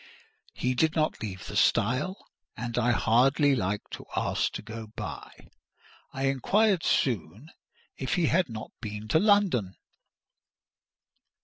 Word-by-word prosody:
He 125 Hz, 0 st, 0 dB
did 160 Hz, +5 st, +1 dB
not 155 Hz, -1 st, 0 dB
leave 95 Hz, -4 st, -6 dB
the -, -, -7 dB
stile, 130 Hz, -, +1 dB, 0.3 s
and 120 Hz, 0 st, -4 dB
I 120 Hz, 0 st, +2 dB
hardly 135 Hz, +5 st, +3 dB
liked 105 Hz, -2 st, -2 dB
to -, -, -8 dB
ask -, -, 0 dB
to -, -, -6 dB
go 110 Hz, 0 st, -8 dB
by. -, -, -8 dB, 0.6 s
I 135 Hz, -, -4 dB
inquired 185 Hz, -, +2 dB
soon 115 Hz, -, -1 dB, 0.5 s
if 130 Hz, -, -1 dB
he 175 Hz, -, +2 dB
had 170 Hz, 0 st, +2 dB
not 110 Hz, -1 st, -7 dB
been 105 Hz, -1 st, -6 dB
to 160 Hz, -, +4 dB
London. 195 Hz, -, +2 dB
125 Hz, 130 wpm, -28 LUFS, 110-160 Hz, 0.6 s, to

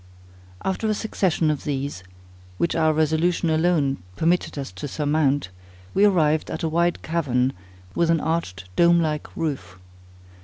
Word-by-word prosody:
After 190 Hz, +3 st, -1 dB
a 215 Hz, -, +1 dB
succession 180 Hz, -7 st, 0 dB
of 150 Hz, -, -4 dB
these, 140 Hz, -8 st, -3 dB, 0.5 s
which 170 Hz, -, 0 dB
our 160 Hz, -1 st, +3 dB
resolution 160 Hz, +2 st, +1 dB
alone 155 Hz, -4 st, +2 dB, 0.2 s
permitted 170 Hz, -, 0 dB
us 135 Hz, -6 st, -5 dB
to 95 Hz, +10 st, -6 dB
surmount, 145 Hz, -4 st, 0 dB, 0.4 s
we 200 Hz, -, +4 dB
arrived 160 Hz, -6 st, +2 dB
at -, -, -4 dB
a -, -, +1 dB
wide 170 Hz, +2 st, +1 dB
cavern 135 Hz, -6 st, 0 dB, 0.4 s
with 170 Hz, +7 st, +1 dB
an 165 Hz, -1 st, +3 dB
arched 145 Hz, -, -2 dB
dome 170 Hz, 0 st, +5 dB
like 155 Hz, -2 st, -1 dB
roof. 140 Hz, -, -3 dB
160 Hz, 145 wpm, -23 LUFS, 145-170 Hz, 0.5 s, dome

